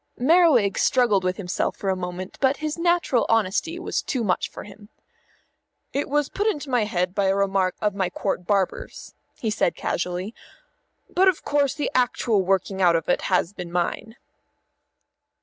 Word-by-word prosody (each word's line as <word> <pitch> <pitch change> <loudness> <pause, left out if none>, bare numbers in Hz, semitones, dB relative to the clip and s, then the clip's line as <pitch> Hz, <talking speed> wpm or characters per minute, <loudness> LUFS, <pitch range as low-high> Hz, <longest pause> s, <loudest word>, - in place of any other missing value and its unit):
Merriwig 270 - +4
struggled 240 -8 +3
with 185 0 -1
himself 180 -3 -2
for 195 - -1
a - - 0
moment, 180 +1 -6
but 270 +1 +3
his 305 -1 -3
natural 340 -7 +1
honesty 225 - +1
was 355 - -2
too 255 -5 -2
much 185 -4 0
for - - -9
him. 205 +1 -14 1.0
"It 280 - -2
was 295 0 +1
put 410 +2 -2
into 295 -9 -2
my 240 -4 +2
head 180 -3 -1
by 200 0 0
a 190 0 +2
remark 195 -2 +1
of 210 -1 +1
my 190 -2 -1
Court 180 -1 -3
Barber's," 195 -3 -2 0.2
he 220 - -2
said 205 -4 +1
casually. 180 +4 -3 0.7
"But 380 +2 +2
of 370 -4 +2
course 285 -2 +1
the 295 - -2
actual 240 -4 +2
working 190 +1 0
out 175 -2 +5
of 165 -1 -1
it - - +2
has 185 0 +1
been 180 -3 -7
mine." 180 +5 -2
205 Hz, 170 wpm, -24 LUFS, 185-270 Hz, 1.0 s, out